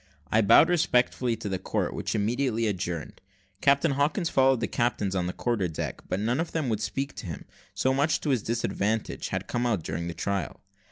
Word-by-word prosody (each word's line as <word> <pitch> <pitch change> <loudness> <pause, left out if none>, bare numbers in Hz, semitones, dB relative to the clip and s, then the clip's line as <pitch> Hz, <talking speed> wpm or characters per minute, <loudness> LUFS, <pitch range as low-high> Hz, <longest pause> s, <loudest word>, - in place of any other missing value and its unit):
I 110 - +4
bowed 110 +9 +7
respectfully 125 -8 +2
to 105 - -6
the 95 -2 -2
court, - - -2
which - - -3
immediately 115 +2 0
adjourned. 90 -6 -3 0.4
Captain 140 +3 +4
Hawkins 150 +6 +1
followed 135 -2 +4
the - - 0
captains 105 -5 0
on 90 -1 0
the - - -1
quarter 110 -3 -1
deck, 80 - -5
but 90 - 0
none 120 +6 0
of 165 0 -2
them 155 -6 -1
would 110 -2 -1
speak 135 +4 -2
to 100 - -6
him 80 - -6 0.3
so 130 - +2
much 145 +4 +2
to 150 - 0
his 125 -4 +2
disadvantage 110 -1 -1
had - - -3
come 120 0 -1
out 105 -9 0
during 80 +2 -3
the 85 - -5
trial. 100 -6 -3
115 Hz, 205 wpm, -27 LUFS, 100-135 Hz, 0.4 s, bowed